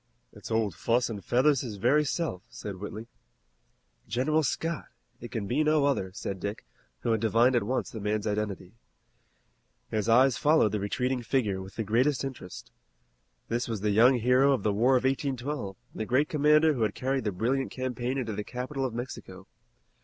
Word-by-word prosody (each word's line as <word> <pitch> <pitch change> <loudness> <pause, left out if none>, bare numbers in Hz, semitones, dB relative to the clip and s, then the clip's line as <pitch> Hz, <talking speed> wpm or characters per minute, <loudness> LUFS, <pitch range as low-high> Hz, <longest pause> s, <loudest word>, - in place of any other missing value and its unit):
"It's - - -10
Old 110 -4 0
Fuss 115 +7 0
and 100 -4 -6
Feathers 130 +5 +3
his 115 -5 -5
very 125 +9 +3
self," 145 - -2
said 100 -2 -7
Whitley. 105 +3 -7 1.0
"General 155 +6 +1
Scott. 165 +3 -2 0.3
It 120 - -8
can 110 -3 -3
be 130 +10 +1
no 155 -1 +3
other," 115 -10 0
said 95 0 -5
Dick, 100 +3 -5 0.4
who 115 - 0
had 110 -2 +1
divined 115 +3 +3
at 120 - +3
once 125 +6 -2
the 110 - -6
man's 105 0 -1
identity. 105 -3 -3 1.2
His 110 +1 -1
eyes 125 0 +5
followed 150 -5 +4
the 105 - -1
retreating 125 +5 -1
figure 110 -6 0
with 95 0 -10
the 110 - -2
greatest 125 +7 +1
interest. 130 -9 -8 0.8
This 120 +1 -1
was 110 -4 -3
the 105 0 +1
young 120 +6 +6
hero 125 +4 +4
of 125 - -1
the 105 - +1
War 120 +6 +3
of 125 - +2
1812 130 - -2 0.2
and - - -10
the - - -1
great 135 +4 +2
commander 150 +1 +4
who 125 - -4
had 110 - 0
carried 135 +1 -1
the 105 - -1
brilliant 125 +8 -1
campaign 130 0 -3
into 115 -5 -2
the 105 - -3
capital 130 +4 -4
of 125 -3 -2
Mexico. 110 -6 -7
120 Hz, 185 wpm, -28 LUFS, 105-135 Hz, 1.2 s, young